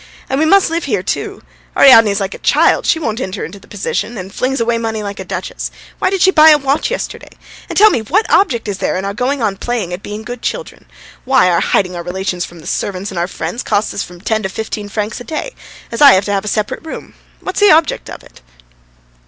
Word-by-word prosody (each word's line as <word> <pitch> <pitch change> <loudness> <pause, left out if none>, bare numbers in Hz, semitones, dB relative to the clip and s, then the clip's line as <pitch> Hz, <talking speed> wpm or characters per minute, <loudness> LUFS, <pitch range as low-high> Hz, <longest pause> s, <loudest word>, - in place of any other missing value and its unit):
And 270 - +1
we 315 - +3
must 390 -1 +4
live 335 +1 -1
here 210 -9 -1
too. - - -4 0.3
Ariadne's 225 -7 +7
like 195 -1 -3
a - - -9
child; - - +3
she - - +3
won't 230 -7 -3
enter 190 -2 -4
into 200 +4 -10
the - - -20
position, 215 +3 -3
and 190 0 -7
flings 265 +2 -1
away 230 0 +1
money 220 -2 -3
like 200 -1 -6
a - - -4
duchess. - - -5 0.3
Why - - +2
did 385 -1 +1
she 380 - +6
buy 315 -3 +7
a 305 - +7
watch 275 +1 0
yesterday? - - -5 0.4
And, - - -4
tell 430 +1 +7
me, 235 - 0
what 365 - +1
object 260 - +2
is 195 -2 -4
there - - -1
in 190 - -3
our 200 - -3
going 255 +4 -1
on 200 -3 0
playing 230 -7 -3
at 180 - -5
being 210 +2 -7
good 245 +1 -7
children? - - -5 0.4
Why, 260 -8 +3
our 170 - +2
hiding 180 -2 +1
our 175 - -4
relations 180 0 -3
from 175 -1 -13
the - - -15
servants 195 0 -3
and 180 - -4
our 175 - 0
friends 235 +5 -5
costs 205 +1 -1
us - - -3
from 175 0 -9
ten 220 +2 0
to 190 - -3
fifteen 210 +1 -5
francs 210 +1 -3
a - - -6
day, 320 - -5 0.4
as 230 - -4
I 280 -2 +9
have 190 +1 +2
to 205 - -1
have 195 0 -1
a - - -5
separate 210 +6 -2
room. 320 - -8 0.3
What's 375 - -4
the 410 -1 +6
object 320 -2 +3
of - - -9
it?" - - -18
220 Hz, 245 wpm, -16 LUFS, 195-280 Hz, 0.4 s, I